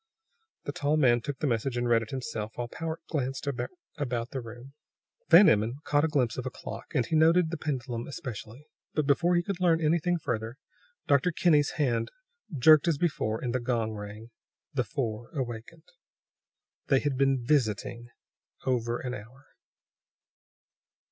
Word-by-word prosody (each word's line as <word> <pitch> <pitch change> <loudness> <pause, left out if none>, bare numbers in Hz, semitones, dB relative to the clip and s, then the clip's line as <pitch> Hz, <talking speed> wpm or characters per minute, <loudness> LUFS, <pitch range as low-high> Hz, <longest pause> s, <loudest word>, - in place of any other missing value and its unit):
The - - -3
tall 145 +2 0
man 120 -5 +4
took 140 +3 -4
the - - -2
message 120 0 0
and 120 0 0
read 115 -1 +4
it 110 - -7
himself, 120 -5 -4
while 120 - -3
Powart 160 +5 -5
glanced 135 -4 -2
about 140 - -4
the 135 - -3
room. 120 +4 -11 0.6
Van 180 +5 +9
Emmon 110 +4 +3
caught 145 0 +2
a - - +3
glimpse 130 -6 0
of 125 - -5
a - - -1
clock, 130 - -9
and 125 -4 +2
he 160 - -1
noted 165 +1 +4
the 170 - -3
pendulum 130 -6 -3
especially. 130 0 -7 0.3
But 155 - +1
before 170 +5 +3
he 175 - +2
could 195 0 -4
learn 170 -3 +3
anything 170 +2 +2
further, 115 -5 -3 0.5
Dr. 140 +5 +3
Kinney's 155 -3 +3
hand 125 -7 +1 0.5
jerked 155 +5 +6
as 165 -4 +2
before, 125 -9 0
and 120 -2 -1
the 130 - +1
gong 120 -2 -1
rang. 105 +2 -8 0.4
The 130 -3 +1
four 120 -6 -4
awakened. 130 +6 -6 1.0
They 135 - +4
had 145 -2 -1
been 135 -2 +2
"visiting" 120 -3 0 0.6
over 120 -2 0
an 125 -1 -5
hour. 125 +5 -11
130 Hz, 160 wpm, -28 LUFS, 120-155 Hz, 1.0 s, Van